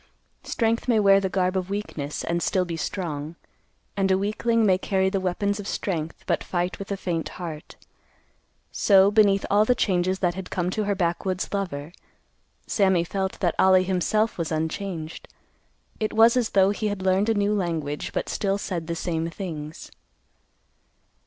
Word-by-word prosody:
Strength 230 Hz, +1 st, -1 dB
may 230 Hz, -3 st, +4 dB
wear 195 Hz, -1 st, +6 dB
the 190 Hz, -1 st, -1 dB
garb 185 Hz, 0 st, 0 dB
of 185 Hz, 0 st, -2 dB
weakness, 160 Hz, -8 st, -4 dB
and 170 Hz, +1 st, -1 dB
still 185 Hz, +1 st, +1 dB
be 170 Hz, -1 st, -4 dB
strong; 160 Hz, -2 st, -4 dB, 0.6 s
and 195 Hz, -1 st, +1 dB
a 190 Hz, -, +4 dB
weakling 215 Hz, +3 st, +1 dB
may 185 Hz, -2 st, +3 dB
carry 190 Hz, 0 st, +1 dB
the 195 Hz, -, 0 dB
weapons 200 Hz, +3 st, -1 dB
of 205 Hz, -, -6 dB
strength, 165 Hz, -7 st, -3 dB
but -, -, 0 dB
fight 175 Hz, 0 st, -2 dB
with 195 Hz, 0 st, -7 dB
a 200 Hz, -, -1 dB
faint 170 Hz, -4 st, -2 dB
heart. 160 Hz, -4 st, -7 dB, 1.0 s
So, 195 Hz, -1 st, +5 dB
beneath 205 Hz, -2 st, +4 dB
all 205 Hz, +1 st, +5 dB
the 245 Hz, +3 st, +2 dB
changes 185 Hz, -3 st, +1 dB
that 175 Hz, -2 st, 0 dB
had 190 Hz, 0 st, -7 dB
come 180 Hz, 0 st, -1 dB
to 215 Hz, +2 st, -1 dB
her 200 Hz, 0 st, 0 dB
backwoods 185 Hz, +1 st, -1 dB
lover, 170 Hz, -7 st, -3 dB, 0.7 s
Sammy 190 Hz, -4 st, +2 dB
felt 190 Hz, +2 st, -3 dB
that 175 Hz, -3 st, +2 dB
Ollie 185 Hz, -1 st, +6 dB
himself 190 Hz, +4 st, 0 dB
was 165 Hz, -1 st, -2 dB
unchanged. 160 Hz, +1 st, -4 dB, 0.7 s
It 215 Hz, -, -1 dB
was 225 Hz, +2 st, +6 dB
as 245 Hz, -3 st, +1 dB
though 190 Hz, +1 st, +6 dB
he 210 Hz, +1 st, -2 dB
had 205 Hz, -2 st, -3 dB
learned 190 Hz, +3 st, +2 dB
a 225 Hz, -, +2 dB
new 205 Hz, 0 st, +1 dB
language, 165 Hz, -7 st, -2 dB
but -, -, -2 dB
still 195 Hz, -1 st, 0 dB
said 175 Hz, -5 st, -4 dB
the 170 Hz, -, -2 dB
same 165 Hz, -1 st, -2 dB
things. 160 Hz, -4 st, -7 dB
190 Hz, 170 wpm, -25 LUFS, 170-200 Hz, 1.0 s, wear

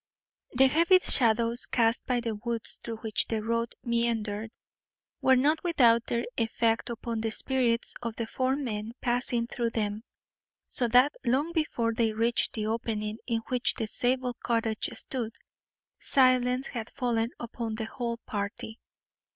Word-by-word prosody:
The 265 Hz, +2 st, +6 dB
heavy 335 Hz, +7 st, +5 dB
shadows 235 Hz, -7 st, +3 dB
cast 230 Hz, -2 st, +1 dB
by 245 Hz, -2 st, +1 dB
the 230 Hz, -2 st, -2 dB
woods 230 Hz, +1 st, -5 dB
through 230 Hz, -, -5 dB
which 220 Hz, -2 st, +1 dB
the 220 Hz, -2 st, -2 dB
road 230 Hz, +1 st, -1 dB
meandered 225 Hz, -2 st, -1 dB, 0.7 s
were 265 Hz, -, +5 dB
not 300 Hz, +5 st, +2 dB
without 240 Hz, -9 st, +4 dB
their 235 Hz, 0 st, -1 dB
effect 225 Hz, 0 st, 0 dB
upon 230 Hz, -1 st, -4 dB
the 225 Hz, -, -1 dB
spirits 240 Hz, 0 st, +1 dB
of 230 Hz, -2 st, -4 dB
the 230 Hz, -, -3 dB
four 255 Hz, +3 st, 0 dB
men 225 Hz, -5 st, -4 dB
passing 245 Hz, -1 st, +1 dB
through 235 Hz, 0 st, -2 dB
them, 210 Hz, -2 st, -2 dB, 0.7 s
so 245 Hz, -, -1 dB
that 250 Hz, +5 st, +5 dB
long 270 Hz, +6 st, +1 dB
before 245 Hz, -8 st, 0 dB
they 225 Hz, -1 st, +1 dB
reached 230 Hz, +2 st, +1 dB
the 215 Hz, -2 st, -3 dB
opening 220 Hz, -1 st, -2 dB
in 230 Hz, -2 st, 0 dB
which 250 Hz, -1 st, +1 dB
the 225 Hz, -, -2 dB
Zabel 250 Hz, +3 st, +1 dB
cottage 225 Hz, -2 st, -1 dB
stood, 230 Hz, -4 st, -4 dB, 0.6 s
silence 255 Hz, -1 st, +3 dB
had 235 Hz, -4 st, -5 dB
fallen 235 Hz, -3 st, -1 dB
upon 230 Hz, -1 st, -4 dB
the 220 Hz, 0 st, -3 dB
whole 235 Hz, 0 st, -4 dB
party. 215 Hz, +2 st, -5 dB
235 Hz, 150 wpm, -28 LUFS, 225-250 Hz, 0.7 s, The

